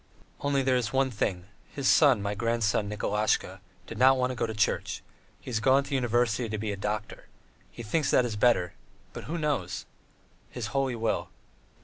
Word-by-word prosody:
Only 140 -1 0
there 130 -1 +2
is 120 -4 -2
one 135 0 +1
thing: 95 -5 -2 0.2
his 140 -2 -3
son, 135 -9 +5
my 100 0 -1
grandson 110 -1 0
Nikolasha, 105 -2 -1 0.2
did - - -8
not 130 +1 +6
want 125 0 0
to - - -5
go - - -1
into 110 -1 -5
the - - -10
Church; - - 0 0.4
he - - -9
has 110 - 0
gone 135 +4 +4
to - - -11
the 140 - -1
university 120 -2 +1
to 110 - -3
be 105 0 -3
a - - -3
doctor. 105 +1 -4 0.4
He 120 - -9
thinks 140 +7 0
it 125 - +4
is 115 -3 -3
better; 105 -6 +2 0.4
but - - -8
who 165 +4 -3
knows! 140 - -2 0.6
His 120 -4 -5
Holy 135 -2 0
Will!" 115 -1 -1
115 Hz, 200 wpm, -28 LUFS, 105-130 Hz, 0.6 s, not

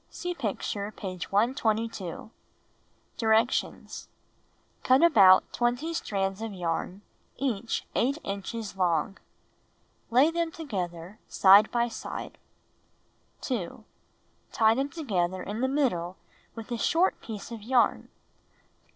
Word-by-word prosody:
(See 355 0 -4
picture, 210 - -3
page 185 -5 -7
122.) 220 - -1 0.9
Directions: 225 +1 0 0.7
1. - - -36 0.2
Cut - - +7
about 195 - +6
20 245 +7 0
strands 195 -8 -2
of 225 -1 -4
yam, 180 +1 -3 0.3
each 235 -4 -2
8 275 +5 +1
inches 200 +2 -5
long. 180 0 0 0.9
Lay 265 +7 +4
them 335 0 -1
together 185 - -5
side 200 +2 +6
by 235 0 +1
side. 230 - -7 1.0
2. 220 -5 -4 0.7
Tie 220 -1 +4
them 270 +4 -1
together 185 - -2
in 215 +3 -5
the 260 - +2
middle 190 - -1 0.4
with 225 +1 -9
a 235 - -2
short 340 - +2
piece 220 0 -8
of 230 -2 -7
yarn. 240 +3 +1
220 Hz, 110 wpm, -28 LUFS, 195-255 Hz, 1.0 s, Cut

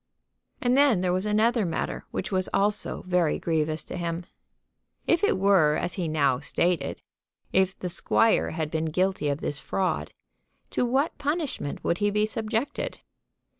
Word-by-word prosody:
And 245 0 +2
then 275 -9 +4
there 180 -1 +1
was 185 +3 0
another 220 +2 +3
matter 170 -3 -3
which 190 - -4
was 185 -1 0
also 205 +1 0
very 180 -3 +1
grievous 160 -1 -1
to - - -8
him. 170 0 -3 0.8
If 340 - +2
it 410 - +3
were 185 -6 +4
as 175 - -1
he 180 -4 -2
now 140 -5 +2
stated, 165 0 -1 0.5
if 190 0 +2
the 180 - -4
squire 200 +5 +2
had 160 -2 -3
been 160 0 -1
guilty 180 -1 0
of 140 +2 -2
this 145 - -3
fraud, 190 +3 -1 0.6
to - - +1
what 270 +6 +1
punishment 290 - -2
would 170 - 0
he 205 0 +2
be 210 +1 +2
subjected? 220 +3 -3
185 Hz, 160 wpm, -26 LUFS, 160-215 Hz, 0.8 s, then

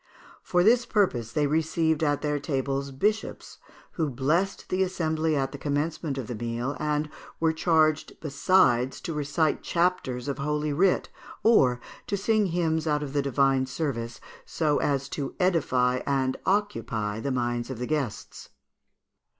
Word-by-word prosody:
For 175 0 +2
this 240 +4 +4
purpose 130 - +1
they 150 -2 +1
received 160 +1 +1
at 145 -2 +1
their 150 -1 0
tables 140 -1 -2
bishops, 210 +11 -2 0.3
who 160 -3 -1
blessed 155 +10 -1
the 185 - 0
assembly 160 -4 0
at 135 -1 0
the 140 - -8
commencement 145 0 -2
of 130 - -3
the 125 - -5
meal, 120 +4 -3
and 150 0 0 0.3
were 160 -1 +2
charged 155 -2 +1
besides 135 -5 +2
to 165 - -4
recite 150 +1 0
chapters 170 -8 0
of 140 - -3
holy 150 +1 -1
writ, 185 +5 +2 0.3
or 130 - +4 0.3
to 200 - -1
sing 215 +1 +2
hymns 165 -2 0
out 150 -1 +1
of 140 -1 -6
the 145 - +2
divine 135 -1 +2
service, 125 -5 -3 0.2
so 150 -3 0
as 140 -2 0
to 140 -2 -4
edify 130 -9 +2
and 135 -2 +1
occupy 115 - -1
the 140 - -3
minds 120 -2 -1
of 130 - -5
the 125 - -3
guests. 140 -6 -4
150 Hz, 150 wpm, -27 LUFS, 130-165 Hz, 0.3 s, this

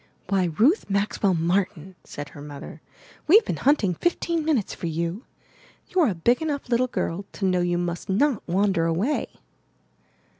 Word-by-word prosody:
''Why, 185 -3 +1
Ruth 290 - +3
Maxwell 200 -1 +1
Martin," 180 +1 -1
said 145 -1 -8
her 145 - -12
mother, 145 -1 -9 0.2
' - - -25
'we've 420 +8 +7
been - - -2
hunting 260 -10 +2
fifteen 335 - -1
minutes 295 -10 0
for 170 - -5
you. 170 - -3 0.6
You're 355 -5 +3
a 190 - -2
big 235 - +2
enough 290 -5 -3
little 250 +1 +2
girl 195 -5 -3
to 195 - -3
know 180 -1 +2
you 175 0 0
must 175 +1 -3
not 245 +5 +2
wan 195 +3 +2
der 165 -3 +1
away." 185 - 0
195 Hz, 165 wpm, -24 LUFS, 175-265 Hz, 0.6 s, we've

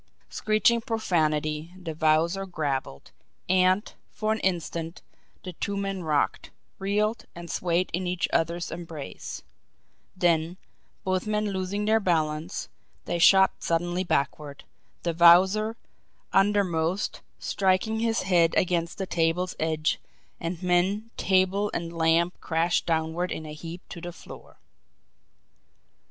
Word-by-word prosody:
Screeching 215 +2 +2
profanity, 155 -7 -1
the 165 -3 -5
Wowzer 160 +5 +2
grappled; 140 - -3 0.4
and, 185 +3 +3 0.2
for 215 +1 -1
an 220 - -3
instant, 170 -2 -2 0.4
the 185 - -6
two 200 +4 -3
men 195 -1 -2
rocked, 155 -3 0 0.3
reeled, 210 +3 0
and 170 -1 -7
swayed 175 +1 0
in 180 +2 -1
each 180 0 0
other's 170 +1 0
embrace; 165 - -7 0.7
then, 170 0 +1 0.5
both 185 +1 -1
men 210 -1 0
losing 195 +2 -2
their 220 +1 +4
balance, 160 -2 -1 0.4
they 175 - -2
shot 190 +2 +5
suddenly 175 +2 0
backward, 145 -3 -2 0.4
the 170 - 0
Wowzer, 190 +7 +5 0.6
undermost, 195 -3 +1 0.2
striking 195 +3 +1
his 230 0 0
head 175 -3 +3
against 170 -2 0
the 195 - -2
table's 170 +1 0
edge 155 -1 0 0.4
and 170 +2 -4
men, 190 +5 +1
table, 190 +2 +2
and 170 0 -3
lamp 165 +2 +2
crashed 165 +1 0
downward 165 +2 0
in 155 - -4
a 150 - -7
heap 165 +3 -9
to 170 - -8
the 175 0 -6
floor. - - -13
175 Hz, 120 wpm, -26 LUFS, 165-195 Hz, 0.7 s, shot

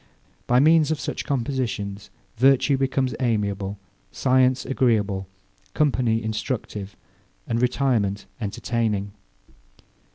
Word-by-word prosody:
By 125 +1 +4
means 155 +2 +5
of 155 -2 -1
such - - -4
compositions, 120 -7 -2 0.3
virtue 135 +3 +4
becomes 135 -1 0
amiable, 100 -5 -1 0.3
science 130 0 +2
agreeable, 105 -7 +1 0.5
company 125 -6 +1
instructive, 110 -3 -4 0.5
and 115 0 -1
retirement 120 -6 +1 0.2
entertaining. 105 -1 -1
120 Hz, 90 wpm, -24 LUFS, 105-130 Hz, 0.5 s, means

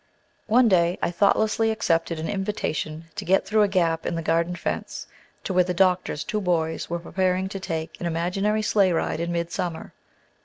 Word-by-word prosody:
One 240 +3 +5
day 175 -3 +3
I - - -1
thoughtlessly 215 +4 +2
accepted 170 -7 0
an 160 - -3
invitation 170 -6 -3
to - - -5
get 190 +2 +2
through 215 0 +2
a 205 - +5
gap 170 -4 +1
in - - -2
the 165 - -3
garden 170 +2 +1
fence, 170 - -4 0.4
to 190 - -3
where 180 0 +5
the 180 0 -3
doctor's 180 -4 +1
two 210 - -2
boys 165 -3 -1
were 170 - -1
preparing 185 +2 -1
to 195 - -5
take 165 -4 -5
an 175 - -1
imaginary 195 +6 0
sleigh 200 -4 +3
ride 160 -1 -1
in 170 +1 -2
midsummer. 170 -1 -3
180 Hz, 185 wpm, -24 LUFS, 165-195 Hz, 0.4 s, One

